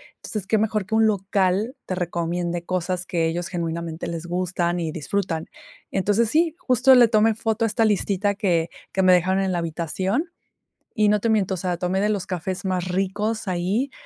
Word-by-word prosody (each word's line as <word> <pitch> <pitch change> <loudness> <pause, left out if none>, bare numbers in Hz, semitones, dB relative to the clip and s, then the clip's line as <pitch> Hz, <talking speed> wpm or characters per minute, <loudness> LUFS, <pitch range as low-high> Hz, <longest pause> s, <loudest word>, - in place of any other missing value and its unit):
Entonces, 205 -3 -5
¿qué 220 - +3
mejor 215 -2 0
que 220 - -1
un 220 0 +5
local 200 +2 +1
te - - -3
recomiende 175 -1 -2
cosas 185 0 -2
que 165 -3 0
ellos 170 +1 -3
genuinamente 170 -1 -4
les 165 0 -5
gustan 175 0 -1
y 165 -2 -2
disfrutan? 165 +1 -2 0.4
Entonces, 205 +4 +1
sí, 320 0 +2
justo 255 +1 +4
le 245 -2 +7
tomé 220 0 +3
foto 225 0 0
a - - +2
esta 225 +1 +1
listita 205 -1 +1
que 175 -6 0 0.2
que 190 - +1
me 185 - +6
dejaron 185 +2 +3
en 190 - 0
la 175 - 0
habitación, 185 - -2 0.6
y 210 -2 +3
no 210 0 +3
te 230 - 0
miento, 200 -3 +2
o - - -6
sea, 180 0 -2
tomé 180 +2 -1
de 210 - +2
los 205 -3 -1
cafés 185 +1 -4
más 185 -1 -1
ricos 205 +4 -1
ahí, 190 +9 -1
190 Hz, 190 wpm, -23 LUFS, 175-215 Hz, 0.6 s, le